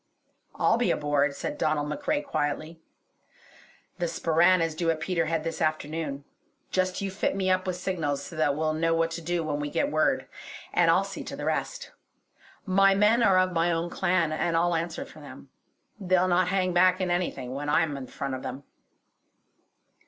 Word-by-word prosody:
"I'll -, -, +3 dB
be -, -, +1 dB
aboard!" 145 Hz, -1 st, +1 dB
said -, -, -5 dB
Donald 150 Hz, -1 st, 0 dB
MacRae 220 Hz, -, -1 dB
quietly. 155 Hz, -, -3 dB, 1.2 s
"The 175 Hz, -, 0 dB
Sporran 170 Hz, +2 st, +3 dB
is 165 Hz, -1 st, 0 dB
due 165 Hz, +1 st, -1 dB
at 160 Hz, -1 st, 0 dB
Peterhead 165 Hz, -2 st, -1 dB
this 165 Hz, 0 st, -4 dB
afternoon. 155 Hz, -2 st, -2 dB, 0.5 s
Just 185 Hz, 0 st, 0 dB
you 195 Hz, -, -2 dB
fit 190 Hz, 0 st, -1 dB
me 190 Hz, -1 st, +1 dB
up 185 Hz, 0 st, +1 dB
with 185 Hz, -, -1 dB
signals 165 Hz, -6 st, -2 dB
so 170 Hz, -, -9 dB
that 145 Hz, -3 st, +1 dB
we'll 155 Hz, +1 st, 0 dB
know 165 Hz, +1 st, +1 dB
what 165 Hz, 0 st, +1 dB
to 165 Hz, +1 st, -5 dB
do 170 Hz, +1 st, -1 dB
when 150 Hz, -2 st, -2 dB
we 145 Hz, 0 st, -3 dB
get 285 Hz, -, 0 dB
word; -, -, +1 dB, 0.5 s
and -, -, +4 dB
I'll -, -, +4 dB
see -, -, -7 dB
to -, -, -6 dB
the -, -, -6 dB
rest. -, -, -3 dB, 0.7 s
My 195 Hz, 0 st, +4 dB
men 210 Hz, +4 st, +4 dB
are 195 Hz, -5 st, +5 dB
of 185 Hz, 0 st, +2 dB
my 170 Hz, +1 st, +2 dB
own 170 Hz, +1 st, -2 dB
clan, 170 Hz, -3 st, +1 dB
and 165 Hz, +1 st, 0 dB
I'll 175 Hz, +1 st, +2 dB
answer 170 Hz, +11 st, -2 dB
for -, -, -14 dB
them. -, -, -12 dB, 0.5 s
They'll 185 Hz, -1 st, +2 dB
not 180 Hz, 0 st, +2 dB
hang 185 Hz, -1 st, 0 dB
back 185 Hz, +1 st, +4 dB
in 185 Hz, -2 st, -1 dB
anything, 135 Hz, -8 st, -2 dB
when 145 Hz, +2 st, -4 dB
I'm 150 Hz, -1 st, +2 dB
in 135 Hz, -2 st, -6 dB
the -, -, -18 dB
front 140 Hz, -1 st, -4 dB
of 130 Hz, -, -4 dB
them." 135 Hz, +2 st, -6 dB
165 Hz, 190 wpm, -27 LUFS, 155-185 Hz, 1.2 s, are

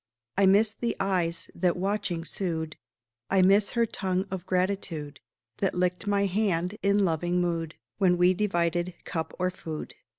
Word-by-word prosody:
I 195 Hz, -, +4 dB
miss 210 Hz, +3 st, +4 dB
the 235 Hz, 0 st, -2 dB
eyes 175 Hz, -4 st, -1 dB
that, 175 Hz, 0 st, +1 dB
watching, 195 Hz, -3 st, -1 dB
sued; 160 Hz, -5 st, -3 dB, 0.5 s
I 190 Hz, -1 st, +4 dB
miss 200 Hz, +2 st, +4 dB
her 235 Hz, -, +4 dB
tongue 190 Hz, -3 st, -1 dB
of 185 Hz, -1 st, -5 dB
gratitude 180 Hz, -6 st, -1 dB, 0.4 s
That 195 Hz, -, 0 dB
licked 180 Hz, +2 st, 0 dB
my 200 Hz, 0 st, +2 dB
hand, 185 Hz, -2 st, 0 dB
in 200 Hz, 0 st, +3 dB
loving 175 Hz, +1 st, 0 dB
mood, 165 Hz, -2 st, -1 dB, 0.2 s
When 180 Hz, -3 st, +4 dB
we 180 Hz, +1 st, +5 dB
divided 175 Hz, -3 st, 0 dB
cup 160 Hz, -1 st, -3 dB
or 185 Hz, 0 st, 0 dB
food. 160 Hz, -4 st, -7 dB
180 Hz, 155 wpm, -27 LUFS, 170-200 Hz, 0.5 s, we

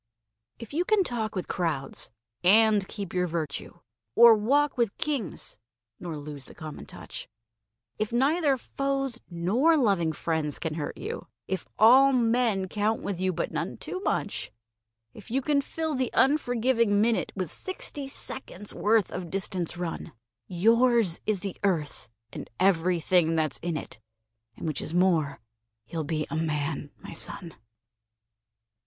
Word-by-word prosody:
If 230 Hz, +3 st, -10 dB
you 335 Hz, +4 st, +1 dB
can 415 Hz, +1 st, +3 dB
talk 225 Hz, -, -3 dB
with 185 Hz, -, -3 dB
crowds 155 Hz, -7 st, -2 dB, 0.3 s
and 210 Hz, +1 st, +5 dB
keep 200 Hz, -5 st, -6 dB
your 180 Hz, -1 st, +1 dB
virtue, 160 Hz, -4 st, -4 dB, 0.3 s
Or 235 Hz, 0 st, +9 dB
walk 275 Hz, +7 st, +2 dB
with 235 Hz, -5 st, 0 dB
Kings 285 Hz, -, -3 dB, 0.4 s
nor 170 Hz, -4 st, -5 dB
lose 145 Hz, -2 st, -8 dB
the -, -, -13 dB
common 155 Hz, -2 st, -8 dB
touch; -, -, -9 dB, 0.7 s
If 215 Hz, +1 st, -1 dB
neither 280 Hz, +3 st, +2 dB
foes 275 Hz, -1 st, -2 dB
nor 215 Hz, -, +2 dB
loving 195 Hz, -, +2 dB
friends 155 Hz, -1 st, -2 dB
can 160 Hz, -3 st, -3 dB
hurt 150 Hz, -2 st, -4 dB
you, 460 Hz, +3 st, -6 dB, 0.2 s
If 190 Hz, -3 st, -3 dB
all 265 Hz, +5 st, +7 dB
men 230 Hz, -5 st, +2 dB
count 210 Hz, +3 st, -1 dB
with 190 Hz, -3 st, -3 dB
you, 185 Hz, 0 st, +2 dB
but 175 Hz, -, -3 dB
none -, -, -3 dB
too 370 Hz, -, -5 dB
much; 390 Hz, -, -2 dB, 0.6 s
If -, -, -13 dB
you 255 Hz, +4 st, +1 dB
can 280 Hz, +1 st, +2 dB
fill 320 Hz, +2 st, -3 dB
the 255 Hz, -3 st, 0 dB
unforgiving 245 Hz, -6 st, +3 dB
minute 225 Hz, +1 st, +1 dB
With 185 Hz, -5 st, -3 dB
sixty 295 Hz, -6 st, -2 dB
seconds' 210 Hz, -7 st, -4 dB
worth 215 Hz, -2 st, +2 dB
of 180 Hz, -2 st, -5 dB
distance 185 Hz, -2 st, -1 dB
run, 175 Hz, -2 st, -5 dB, 0.3 s
Yours 225 Hz, 0 st, +3 dB
is 210 Hz, -4 st, +1 dB
the 195 Hz, -3 st, -4 dB
Earth 165 Hz, -10 st, -1 dB, 0.2 s
and -, -, -7 dB
everything 175 Hz, -2 st, +3 dB
that's 155 Hz, -2 st, +1 dB
in 170 Hz, -2 st, -2 dB
it, 140 Hz, -, -8 dB, 0.6 s
And -, -, -7 dB
which 155 Hz, -3 st, -2 dB
is 165 Hz, -, -5 dB
more 170 Hz, -6 st, +2 dB, 0.5 s
you'll 165 Hz, -2 st, -4 dB
be 155 Hz, 0 st, -2 dB
a -, -, -2 dB
Man, 150 Hz, -2 st, -2 dB
my -, -, -8 dB
son! 165 Hz, 0 st, -4 dB
200 Hz, 150 wpm, -27 LUFS, 165-245 Hz, 0.7 s, Or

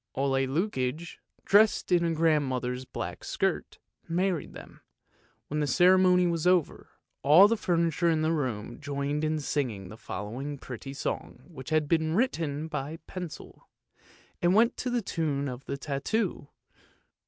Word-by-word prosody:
Ole 135 Hz, 0 st, +1 dB
Lukoie, 155 Hz, -1 st, -2 dB, 0.3 s
dressed 210 Hz, -1 st, +4 dB
in 170 Hz, -2 st, +3 dB
grand 155 Hz, -2 st, +3 dB
mother's 125 Hz, 0 st, -3 dB
black -, -, -6 dB
skirt, -, -, -2 dB, 0.3 s
married 175 Hz, -1 st, -1 dB
them; -, -, -12 dB, 0.7 s
when 150 Hz, -, -2 dB
the 150 Hz, -, 0 dB
ceremony 180 Hz, +4 st, +5 dB
was 170 Hz, -1 st, 0 dB
over, 180 Hz, -4 st, +1 dB, 0.3 s
all 160 Hz, +8 st, +8 dB
the 230 Hz, -, +1 dB
furniture 170 Hz, -3 st, +1 dB
in 160 Hz, -1 st, +1 dB
the 160 Hz, -, +2 dB
room 120 Hz, -7 st, -3 dB
joined 145 Hz, 0 st, -2 dB
in 155 Hz, 0 st, 0 dB
singing 125 Hz, -10 st, -2 dB
the 110 Hz, -, -10 dB
following 125 Hz, +10 st, -5 dB
pretty 130 Hz, +1 st, -8 dB
song -, -, -4 dB
which 150 Hz, -7 st, -10 dB
had 155 Hz, -1 st, +1 dB
been 160 Hz, 0 st, +1 dB
written 160 Hz, -, 0 dB
by 150 Hz, -1 st, -4 dB
the 165 Hz, -, -9 dB
pencil; 180 Hz, -4 st, -9 dB, 0.7 s
it 175 Hz, -, +3 dB
went 220 Hz, +6 st, +4 dB
to 250 Hz, -, -2 dB
the 240 Hz, -2 st, 0 dB
tune 145 Hz, -6 st, -1 dB
of 125 Hz, 0 st, -7 dB
the 140 Hz, -, -4 dB
tattoo. 145 Hz, +6 st, -2 dB
155 Hz, 150 wpm, -28 LUFS, 135-175 Hz, 0.7 s, all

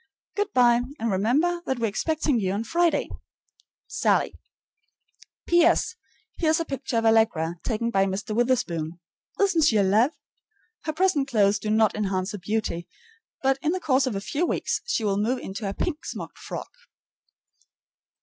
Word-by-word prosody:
Good 410 Hz, -1 st, -1 dB
by; 240 Hz, -4 st, +4 dB, 0.2 s
and 230 Hz, -3 st, -1 dB
remember 285 Hz, -, +1 dB
that 265 Hz, -, 0 dB
we're 235 Hz, -, 0 dB
expecting 290 Hz, +4 st, 0 dB
you 190 Hz, -2 st, -1 dB
on 205 Hz, +3 st, -2 dB
Friday. 340 Hz, +6 st, +1 dB, 0.8 s
SALLIE. 440 Hz, -, +1 dB, 1.1 s
P.S. 345 Hz, +5 st, +3 dB, 0.4 s
Here 320 Hz, -, +2 dB
is 320 Hz, +2 st, +3 dB
a 330 Hz, -, -1 dB
picture 270 Hz, -4 st, -3 dB
of 225 Hz, -, +1 dB
Allegra, 220 Hz, -7 st, +2 dB
taken 230 Hz, +1 st, -2 dB
by 195 Hz, -2 st, +2 dB
Mr. 200 Hz, +3 st, -3 dB
Witherspoon. 185 Hz, -10 st, 0 dB, 0.4 s
Isn't 390 Hz, -5 st, +3 dB
she 225 Hz, -8 st, +4 dB
a 200 Hz, -, +4 dB
love? 215 Hz, +7 st, +4 dB, 0.8 s
Her 310 Hz, -, -1 dB
present 320 Hz, -5 st, +2 dB
clothes 205 Hz, -5 st, +3 dB
do 215 Hz, -, -4 dB
not 215 Hz, 0 st, +3 dB
enhance 195 Hz, -2 st, -1 dB
her 205 Hz, -, -6 dB
beauty, 180 Hz, -3 st, -2 dB, 0.6 s
but 270 Hz, 0 st, +2 dB
in 310 Hz, +3 st, +1 dB
the 370 Hz, -, -1 dB
course 265 Hz, -5 st, +2 dB
of 240 Hz, -, -2 dB
a 195 Hz, -, -2 dB
few 290 Hz, +10 st, -2 dB
weeks -, -, -1 dB
she 480 Hz, -, -1 dB
will 200 Hz, -2 st, +1 dB
move 235 Hz, +5 st, +1 dB
into 200 Hz, -2 st, -5 dB
a -, -, -4 dB
pink 330 Hz, -3 st, -3 dB
smocked -, -, -7 dB
frock. -, -, -7 dB
230 Hz, 165 wpm, -25 LUFS, 205-310 Hz, 1.1 s, by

